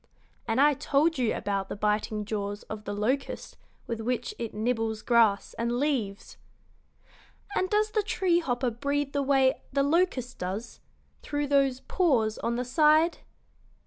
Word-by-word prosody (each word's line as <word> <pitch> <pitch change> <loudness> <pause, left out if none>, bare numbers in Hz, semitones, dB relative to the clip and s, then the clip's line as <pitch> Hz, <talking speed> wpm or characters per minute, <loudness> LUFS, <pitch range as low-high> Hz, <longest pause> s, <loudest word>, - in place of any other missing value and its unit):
And 225 +2 0
I 295 +1 +6
told 285 +3 +1
you 240 -3 +1
about 195 -1 -2
the - - -4
biting 210 0 -1
jaws 205 -1 -4
of 215 -1 -8
the 205 - -3
locust 255 +7 -2 0.3
with 230 -2 -4
which 240 +1 -2
it 230 -2 -3
nibbles 220 0 -1
grass 230 -4 +3
and 235 +1 0
leaves." 240 -9 -2 1.2
"And 370 - +1
does 425 +1 +2
the 430 - +2
tree 370 -3 +1
hopper 250 -5 -1
breathe 280 +4 -2
the 285 - +1
way 270 -1 +3
the 275 0 +2
locust 285 -5 0
does 195 +6 -5 0.4
through 290 -1 -2
those 275 -2 +2
pores 245 - +1
on 235 0 -1
the 250 +1 -2
side?" 310 +5 +4
250 Hz, 150 wpm, -28 LUFS, 220-290 Hz, 1.2 s, I